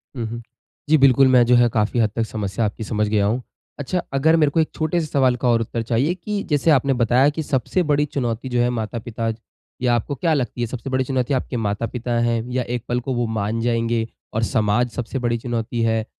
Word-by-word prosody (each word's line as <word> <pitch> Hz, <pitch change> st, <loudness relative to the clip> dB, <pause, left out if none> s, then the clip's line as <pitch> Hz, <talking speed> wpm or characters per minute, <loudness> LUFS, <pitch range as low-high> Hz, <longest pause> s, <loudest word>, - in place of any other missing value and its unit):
हुँ, 120 Hz, -3 st, -3 dB
हुँ। 115 Hz, +1 st, -6 dB, 0.5 s
जी, 155 Hz, -, +6 dB
बिल्कुल 135 Hz, -1 st, +5 dB
मैं 125 Hz, -2 st, +6 dB
जो 125 Hz, +1 st, +4 dB
है 120 Hz, 0 st, +5 dB
काफ़ी 110 Hz, +1 st, 0 dB
हद 110 Hz, -2 st, +3 dB
तक 115 Hz, -, +1 dB
समस्या 105 Hz, 0 st, -2 dB
आपकी 105 Hz, +2 st, -4 dB
समझ 105 Hz, 0 st, -1 dB
गया 105 Hz, -1 st, +2 dB
हूँ। 115 Hz, +5 st, 0 dB, 0.4 s
अच्छा 145 Hz, +6 st, -1 dB
अगर 155 Hz, +4 st, +4 dB
मेरे 155 Hz, -3 st, +3 dB
को 165 Hz, -, +1 dB
एक 160 Hz, -, +2 dB
छोटे-से 160 Hz, +1 st, 0 dB
सवाल 130 Hz, -4 st, +2 dB
का 125 Hz, -, +1 dB
और 115 Hz, -1 st, +3 dB
उत्तर 115 Hz, +1 st, -3 dB
चाहिए 120 Hz, +8 st, +1 dB
कि 200 Hz, +3 st, -4 dB
जैसे 150 Hz, +2 st, +3 dB
आपने 135 Hz, -1 st, +3 dB
बताया 125 Hz, +5 st, +4 dB
कि 155 Hz, +1 st, -4 dB
सबसे 145 Hz, +7 st, 0 dB
बड़ी 145 Hz, 0 st, +3 dB
चुनौती 130 Hz, -4 st, -3 dB
जो 125 Hz, -1 st, +1 dB
है 120 Hz, -, +2 dB
माता-पिता 115 Hz, -1 st, -3 dB, 0.5 s
या 120 Hz, -1 st, +3 dB
आपको 120 Hz, +5 st, -2 dB
क्या 160 Hz, +5 st, +1 dB
लगती 125 Hz, -4 st, -2 dB
है 120 Hz, -, 0 dB
सबसे 125 Hz, +2 st, -6 dB
बड़ी 130 Hz, 0 st, +1 dB
चुनौती? 130 Hz, 0 st, -1 dB
आपके 130 Hz, -1 st, -2 dB
माता-पिता 115 Hz, +3 st, -3 dB
हैं 120 Hz, -1 st, +1 dB
या 125 Hz, 0 st, 0 dB
एक 120 Hz, -, -5 dB
पल 120 Hz, 0 st, 0 dB
को 130 Hz, +2 st, -3 dB
वो 120 Hz, -1 st, 0 dB
मान 105 Hz, +3 st, -1 dB
जाएँगे 115 Hz, -1 st, 0 dB, 0.3 s
और 110 Hz, +1 st, 0 dB
समाज 110 Hz, +1 st, +1 dB
सबसे 125 Hz, +3 st, -4 dB
बड़ी 120 Hz, -1 st, 0 dB
चुनौती 115 Hz, 0 st, -3 dB
है? 110 Hz, -1 st, +1 dB
120 Hz, 225 wpm, -21 LUFS, 115-135 Hz, 0.5 s, जी